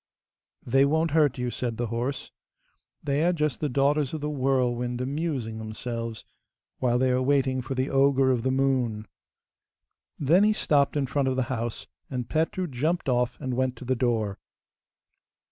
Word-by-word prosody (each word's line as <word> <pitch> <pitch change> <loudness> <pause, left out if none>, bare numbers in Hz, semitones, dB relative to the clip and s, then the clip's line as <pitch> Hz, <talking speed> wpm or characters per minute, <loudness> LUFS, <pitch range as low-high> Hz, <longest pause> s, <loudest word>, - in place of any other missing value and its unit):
'They 135 +3 +4
won't 160 +3 +2
hurt 150 -4 +3
you,' 125 -1 -2
said 120 -3 -3
the 120 - -1
horse; 120 +4 -3 0.7
'they 145 +1 +1
are 175 - +4
just 150 -5 -1
the 150 - -1
daughters 140 +2 +1
of - - -4
the 150 0 -2
whirlwind 125 -3 0
amusing 130 -5 -3
themselves 115 +1 -5 0.5
while 120 -2 +2
they 130 0 +2
are 125 0 +2
waiting 130 -1 +2
for 125 +2 -5
the 130 +1 0
ogre 135 -1 +3
of 125 -3 +1
the 130 - 0
moon.' 130 -5 0 1.1
Then 165 +7 +4
he 215 +1 +4
stopped 145 -7 +2
in 140 - +1
front 135 +1 0
of 130 - +1
the 130 - +1
house, 115 -1 -4 0.2
and 125 -3 -4
Petru 165 +4 0
jumped 155 +3 -1
off 125 -1 +1
and 130 -1 -3
went 130 0 0
to 120 - -10
the 130 +1 +1
door. 115 -5 0
130 Hz, 170 wpm, -26 LUFS, 120-145 Hz, 1.1 s, They